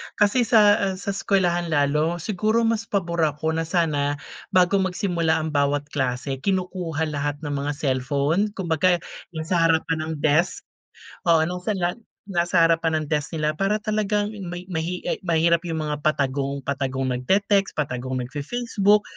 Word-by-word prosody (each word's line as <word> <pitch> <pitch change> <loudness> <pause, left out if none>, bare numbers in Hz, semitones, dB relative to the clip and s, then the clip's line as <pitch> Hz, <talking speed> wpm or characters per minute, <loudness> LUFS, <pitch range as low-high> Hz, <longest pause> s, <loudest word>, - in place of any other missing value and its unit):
Kasi 220 +4 +3
sa, 210 -2 +6
eh, 195 -1 0
sa 200 +2 -4
eskwelahan 180 -3 +1
lalo 150 +2 +1
siguro, 215 +3 +1
mas 225 0 0
pabor 170 -4 -1
ako 150 +2 -2
na 165 0 -2
sana 150 -4 +1 0.3
bago 185 +2 +3
magsimula 175 -4 0
ang 160 - -3
bawat 145 0 +1
klase, 130 -1 -2
kinukuha 180 -2 -1
lahat 145 0 -2
ng 145 - -3
mga 145 +1 -1
cellphone. 140 +7 0
Kumbaga, 180 -1 +2 0.4
yung 160 - -3
sa 165 0 +2
harapan 160 -1 0
ng 160 - -3
desk, 155 +4 +2 0.6
oo. 165 -2 +5
Nung 180 - -3
sanlan 185 -3 -1 0.3
nasa 175 -3 +2
harapan 165 -1 +2
ng - - -6
desk 150 +2 -1
nila 155 -1 +1
para 195 +6 -1
talagang 210 -1 0 0.2
may 175 +1 -6
mahi 170 +2 -3
ay - - -2
mahirap 170 0 +3
yung 160 -2 -2
mga 150 -1 -3
patagong 140 -2 -1
patagong 135 -1 -2
nagte-text, 195 +10 +1
patagong 130 -3 -2
nagfe-Facebook, 205 - +1
165 Hz, 155 wpm, -23 LUFS, 145-190 Hz, 0.6 s, sa